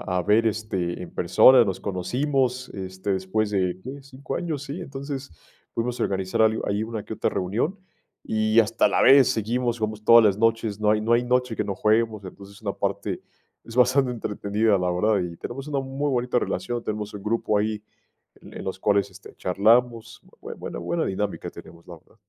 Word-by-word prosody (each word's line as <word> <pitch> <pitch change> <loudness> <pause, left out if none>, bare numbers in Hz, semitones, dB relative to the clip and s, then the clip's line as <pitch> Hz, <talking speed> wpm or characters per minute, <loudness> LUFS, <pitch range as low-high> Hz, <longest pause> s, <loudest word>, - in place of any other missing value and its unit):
a 90 0 -1
a - - 0
ver, 110 +5 +3
este, 100 -5 -2
en 90 - -9
persona, 115 +8 +6
nos 95 -3 -3
conocimos, 125 +6 -1
este, 95 +1 -4
después 95 +3 -1
de, 95 -2 -1
¿qué?, 135 +2 -8
¿5 135 +2 -7
años?, 155 -5 -3
sí, 145 +5 -6
entonces, 140 -2 -6 0.4
pudimos 120 +1 -2
organizar 95 +3 0
algo 110 0 +2
ahí, 100 +1 0
una 110 -1 -4
que - - -7
otra - - -1
reunión, 115 - -2 0.4
y 110 +1 +2
hasta 115 +1 +2
la - - +1
vez 135 -1 +7
seguimos, 120 +1 -1
jugamos 110 -1 -3
todas 115 +1 +8
las 100 -3 +3
noches, 115 -1 0
no 105 0 +2
hay, 105 - +2
no 115 +2 +2
hay 120 +1 +2
noche 125 -2 0
que - - -1
no 100 -1 -3
juguemos, 110 0 +1
entonces, 100 +2 -12
una 100 -3 -3
parte - - -3 0.4
es 115 - -11
bastante 130 +1 +3
entretenida, 105 -2 0
la 90 -1 0
verdad 105 +4 +2
y 85 -2 -4
tenemos 135 +3 -7
una 140 -2 -1
muy 135 +2 -2
bonita 125 -1 +1
relación, 120 +3 -3
tenemos 105 -1 -4
un 100 - -7
grupo 110 -1 0
ahí 105 0 -2 0.6
en - - -14
en - - -7
los 95 0 -5
cuales, 100 -1 +1
este, - - -14
charlamos, 115 +5 +1 0.2
bue - - -7
buena, - - -7
buena 85 0 -1
dinámica 100 +1 -3
tenemos, 85 +1 -14
la 90 - -10
verdad. 80 - -26
110 Hz, 195 wpm, -24 LUFS, 100-125 Hz, 0.6 s, todas